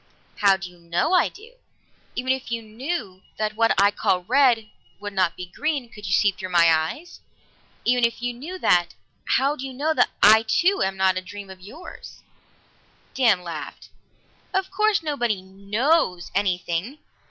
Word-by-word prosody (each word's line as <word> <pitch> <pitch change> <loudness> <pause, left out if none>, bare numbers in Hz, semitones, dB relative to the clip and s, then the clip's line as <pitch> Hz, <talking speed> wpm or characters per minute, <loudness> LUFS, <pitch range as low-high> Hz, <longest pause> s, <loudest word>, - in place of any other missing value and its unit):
"How 200 -2 +4
do 190 -1 -7
you 180 0 -17
know 170 - -1
I 360 - +4
do? 455 +6 -16 0.6
Even 255 +1 -1
if 265 -3 -6
you 230 -1 -2
knew 220 - -5 0.2
that 215 0 -2
what 230 -1 +2
I 200 +1 +5
call 180 -3 0
red 240 0 +3 0.3
would 205 0 -6
not 185 -3 +1
be 180 - -6
green 275 - -3
could 210 -3 -10
you - - -3
see 200 +1 +4
through 185 0 -8
my 170 -2 +5
eyes 160 - -3 0.7
even 245 0 +2
if 235 0 +1
you 245 0 -2
knew 305 +10 -7
that, 175 - +2 0.4
how 275 +3 +1
do 265 - -8
you 265 -1 -6
know 300 +5 0
that - - +3
I 220 +2 +8
too 345 - +2
am 190 0 -2
not 190 -1 +2
a - - -2
dream 200 +1 -10
of 185 -1 -13
yours?" 250 - -12 0.9
Dan 220 -9 +3
laughed. 165 -3 -8 0.7
"Of 380 0 0
course 425 -4 +2
nobody 240 -10 -1
knows 200 - 0
anything. 185 - -1
215 Hz, 175 wpm, -23 LUFS, 185-270 Hz, 0.9 s, I